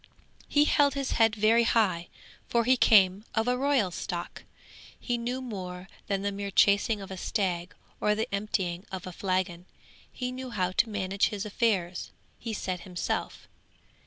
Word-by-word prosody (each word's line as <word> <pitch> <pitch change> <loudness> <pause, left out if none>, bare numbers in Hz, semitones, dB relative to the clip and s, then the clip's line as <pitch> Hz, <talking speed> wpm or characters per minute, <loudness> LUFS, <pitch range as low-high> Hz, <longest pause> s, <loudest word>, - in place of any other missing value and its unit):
'He 290 0 +4
held 285 -2 +3
his 275 -1 -2
head 225 -1 +3
very 220 +2 +4
high, 195 -7 +2 0.4
for 235 0 +2
he 255 +3 +4
came 200 -4 +5
of 220 +1 +1
a 250 - +3
royal 260 -7 +2
stock! 175 0 -5 0.6
He 245 - -1
knew 245 +2 -3
more 185 -5 -6 0.2
than 195 -1 -1
the 200 - 0
mere 200 0 -4
chasing 200 +2 +3
of 195 - -9
a 190 - -5
stag, 180 -3 -2 0.2
or 210 0 +2
the 220 +3 -1
emptying 190 -3 -1
of 190 -2 -5
a 185 - -6
flagon; 185 -2 -2 0.5
he 250 -1 -4
knew 255 0 -6
how 185 -6 -1
to 225 +5 +2
manage 195 -1 0
his 205 0 -4
affairs, 195 -5 0 0.3
he 230 - -5
said 185 -4 -3
himself. 180 -1 -4
205 Hz, 165 wpm, -28 LUFS, 185-235 Hz, 0.6 s, came